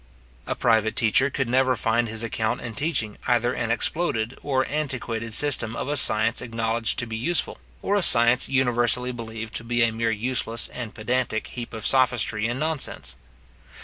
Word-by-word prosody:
A - - -2
private 110 -2 +2
teacher 125 +3 +3
could 130 -1 -2
never 130 +1 +2
find 115 +1 0
his 110 +1 -2
account 115 +1 -2
in 120 -2 -6
teaching 115 -5 -2
either 120 0 +2
an 115 - -3
exploded 120 -2 0
and 130 -2 +1
antiquated 130 -6 -3
system 120 -6 +2
of - - -4
a 145 - -1
science 110 -4 +3
acknowledged 115 -1 -2
to 120 - -1
be 110 -1 -6
useful, 135 +10 -1 0.2
or 200 - +1
a 205 - +2
science 120 -5 +5
universally 125 -1 +2
believed 115 -2 -7
to - - -6
be 120 0 +1
a 115 - +2
mere 115 +1 -1
useless 115 +1 -1
and 120 -3 -7
pedantic 120 0 -2
heap 120 -2 -7
of 110 -1 -7
sophistry 120 -4 +2
and 120 +2 -3
nonsense. 150 - -3
120 Hz, 175 wpm, -24 LUFS, 115-130 Hz, 0.2 s, science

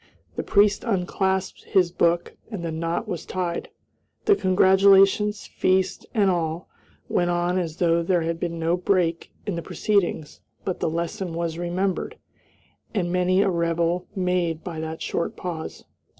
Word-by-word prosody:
The - - -1
priest 205 -1 +3
unclasped 190 -2 -1
his 180 -4 +2
book 170 0 +1
and 195 -7 -5
the 165 - -2
knot 165 +1 -2
was 170 - -4
tied. 175 -2 -3 0.6
The 410 - +6
congratulations, 195 - +4
feast, 185 0 0
and 205 -3 +4
all, 165 -1 -2 0.4
went 175 0 +1
on 175 +1 +1
as 165 -2 -4
though 170 -1 +3
there 175 0 +1
had 165 0 -2
been 170 -1 -3
no 165 +1 +1
break 175 -2 0
in 205 - -2
the 170 - -3
proceedings, 185 -6 -1 0.2
but 185 - -2
the - - 0
lesson 170 +1 -3
was 170 -1 -2
remembered, 180 +2 -2 0.8
and 175 -3 0
many 180 +2 +3
a 195 - +2
rebel 170 +1 0
made 180 -3 0
by 170 -3 -5
that 160 0 -5
short 170 - -2
pause. 165 -3 -6
175 Hz, 150 wpm, -24 LUFS, 170-190 Hz, 0.8 s, The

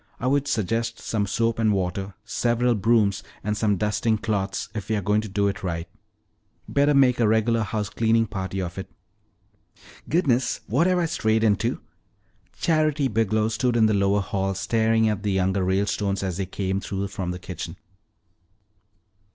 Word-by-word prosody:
"I - - -4
would 140 +2 +1
suggest 115 -2 -1
some 105 -2 -2
soap 115 +3 0
and 110 -2 +3
water, 95 0 -2
several 120 +1 +1
brooms, 105 -2 +2 0.2
and 105 +1 -1
some 105 -2 +1
dusting 105 +2 +1
cloths 100 -3 -2
if 105 -2 -6
we're 110 -1 +1
going 105 +2 +1
to 110 - -7
do 100 +1 +1
it 100 -1 -3
right. 85 -2 -3 0.8
Better 145 +1 +2
make 130 -3 +4
a 115 - +4
regular 110 +1 +2
house 105 0 -2
cleaning 115 +2 +2
party 95 -2 -4
of 85 +1 -6
it." 95 - -7 1.2
"Goodness, 135 -7 +1
what 170 - +2
have 185 0 +2
I 175 - +2
strayed 110 -9 +1
into?" 105 -4 +1 0.8
Charity 155 -4 +2
Biglow 110 -1 +1
stood 120 +2 0
in 110 - +5
the 110 - +3
lower 100 0 +2
hall 95 0 -2
staring 110 +2 +2
at 105 -2 -1
the 100 -1 -1
younger 95 0 +1
Ralestones 100 +1 0
as 95 -3 -2
they 95 -2 -2
came 95 0 -2
through 100 0 -4
from 95 -2 -4
the 90 - -3
kitchen. 90 -2 -7
105 Hz, 165 wpm, -24 LUFS, 95-115 Hz, 1.2 s, in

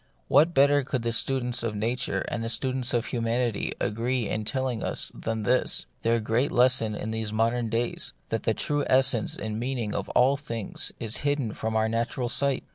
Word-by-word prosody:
What 160 +5 +4
better 145 +1 +5
could 130 -2 -3
the 115 - 0
students 125 0 +1
of 115 -2 -2
Nature 120 +4 -1
and 120 - -3
the 115 - -2
students 130 +1 -1
of 120 -1 0
Humanity 115 -2 -1
agree 120 +1 -1
in 110 -1 -3
telling 130 -1 -2
us - - -2
than 110 -1 -4
this 125 +4 +1
— - - -41
their 115 +1 +2
great 115 +5 0
lesson 120 -3 +3
in 110 +1 -4
these 110 -1 -2
modern 115 +2 0
days 115 +2 -1
— - - -41
that - - -1
the - - 0
true 145 -1 -1
essence 130 -3 +3
and 110 0 -4
meaning 120 -4 -2
of - - -3
all 135 +3 +4
things 115 -7 -2
is 115 0 -1
hidden 145 -6 -1
from 110 0 -3
our 110 0 +2
natural 115 +2 -1
sight 140 +1 +2
120 Hz, 200 wpm, -26 LUFS, 110-130 Hz, -, better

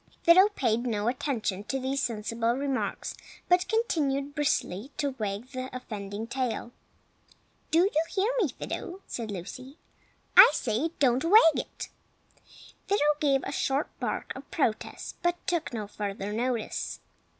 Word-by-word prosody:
Fido 370 +4 +7
paid 235 -1 +1
no 215 -2 -1
attention 240 -7 -1
to 270 - -2
these 270 +1 -1
sensible 230 0 -1
remarks, 275 -1 -2 0.3
but 360 +1 +3
continued 290 - 0
briskly 275 - -1
to 285 -2 0
wag 210 +3 -3
the 255 -1 -5
offending 205 -3 -6
tail. 240 -1 -3 1.0
"Do 330 - +4
you 370 -5 +2
hear 410 +4 +1
me 370 - +3
Fido?" 380 0 -6
said 230 -2 -5
Lucy. 250 - -7 0.6
"I - - +11
say, 240 +8 0
don't 260 0 +3
wag 410 +7 +7
it!" - - -5 1.0
Fido 405 -5 +2 0.2
gave 275 -4 +2
a - - -4
short 275 0 0
bark - - -3
of 270 +2 -10
protest, 230 -9 -2
but 345 0 +2
took 345 -3 -1
no 220 -3 -4
further 200 0 -4
notice. 235 0 -2
260 Hz, 140 wpm, -28 LUFS, 225-295 Hz, 1.0 s, I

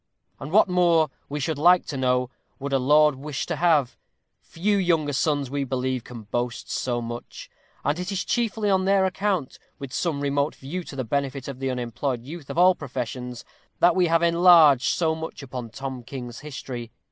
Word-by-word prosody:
And 135 - -7
what 210 +3 +5
more, 170 -4 +3 0.2
we 145 +1 -3
should 145 +1 -2
like 175 +3 +5
to 145 - -5
know, 125 -1 +1 0.3
would 140 0 -5
a 135 - +3
lord 150 +3 +5
wish 140 +1 -5
to - - -2
have? 155 -7 +2 0.4
Few 205 +5 -1
younger 165 -6 +1
sons, 145 -2 0
we 140 0 -1
believe, 130 -2 -2
can 120 -3 -10
boast 120 +3 -3
so 120 -2 -1
much; 120 +1 -8 0.3
and 145 +4 0
it 180 +2 -4
is 190 -2 -2
chiefly 225 -3 0
on 190 -1 +2
their 195 0 +3
account, 190 -6 -1 0.2
with 140 -2 -8
some 165 -5 -1
remote 140 +1 0
view 170 +7 -6
to - - -9
the 130 - -2
benefit 135 +2 -2
of 135 -2 -7
the 135 0 -2
unemployed 125 0 -3
youth 150 +2 -9
of - - -5
all 180 +1 +6
professions, 125 -4 -6 0.3
that 175 0 +4
we 180 -2 +3
have 165 +1 +2
enlarged 170 -6 +6
so 160 -2 +1
much 160 -2 -7
upon 125 -3 -6
Tom 130 +2 -6
King's 120 -1 -8
history. 130 -5 -7
140 Hz, 190 wpm, -24 LUFS, 130-170 Hz, 0.4 s, all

